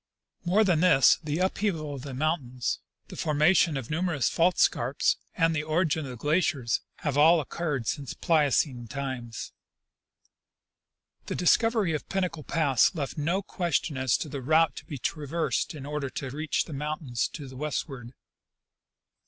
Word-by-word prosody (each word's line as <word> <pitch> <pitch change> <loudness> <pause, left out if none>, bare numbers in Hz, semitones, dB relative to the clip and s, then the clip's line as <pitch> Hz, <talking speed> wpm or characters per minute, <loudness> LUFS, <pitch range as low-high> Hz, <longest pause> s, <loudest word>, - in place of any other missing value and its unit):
More 190 +5 +3
than 180 -6 +2
this, 155 -7 +5
the 150 0 -2
upheaval 185 -5 -1
of 135 - -6
the 135 -1 -7
mountains, 130 -5 -1 0.3
the - - -8
formation 155 +1 +3
of 135 +1 -6
numerous 160 -5 0
fault 175 +2 +2
scarpfe, 125 +5 +2 0.2
and 165 -1 +3
the 155 - 0
origin 155 0 0
of - - -7
the 125 - -7
glaciers, 145 -4 +1 0.2
have 145 -1 0
all 165 +3 +6
o"ccurred 150 -4 -3
since 140 +3 -3
Pliocene 145 -6 +1
times. 125 -3 -5 1.8
The - - -3
discovery 215 0 +3
of 150 - -4
Pinnacle 185 -4 -2
pass 145 - +2
left 145 -4 -3
no 175 +7 0
question 170 -5 -1
as 130 -2 +1
to - - -5
the 140 -2 -5
route 155 +2 +3
to - - -8
be 145 - -6
traversed 155 +5 -2
in 140 -2 -8
order 145 -1 -3
to 130 0 -5
reach 155 +1 -1
the 160 - -8
mountains 140 -6 -2
to 145 -3 -7
the 130 - -11
westward. 135 -3 -4
150 Hz, 155 wpm, -27 LUFS, 135-165 Hz, 1.8 s, all